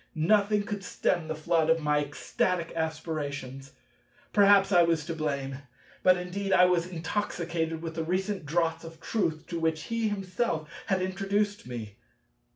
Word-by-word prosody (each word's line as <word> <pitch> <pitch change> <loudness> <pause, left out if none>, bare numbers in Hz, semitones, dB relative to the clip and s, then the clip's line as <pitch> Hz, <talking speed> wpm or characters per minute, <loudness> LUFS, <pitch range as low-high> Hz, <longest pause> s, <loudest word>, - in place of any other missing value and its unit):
Nothing 205 +5 +3
could 205 -1 -5
stem 175 -2 0
the 160 - -3
flood 160 +1 +1
of 165 0 +4
my 150 -1 +2
ecstatic 170 +4 -1
aspirations. 145 -4 -4 0.6
Perhaps 200 -1 +6
I 175 -2 +6
was 165 -3 +2
to 165 - -3
blame; 140 -4 -3 0.4
but 185 0 +5
indeed 190 +2 -3
I 180 -1 +7
was 180 -1 +2
intoxicated 170 -2 -2
with 165 -1 -4
the 165 0 -2
recent 185 +2 -1
draughts 165 +1 0
of 165 -1 -10
Truth 165 -5 -1
to 170 - -3
which 160 -1 0
he 230 -1 -1
himself 190 -4 -2 0.2
had 190 -2 +1
introduced 200 0 -1
me. 110 -5 -7
165 Hz, 155 wpm, -28 LUFS, 155-195 Hz, 0.6 s, I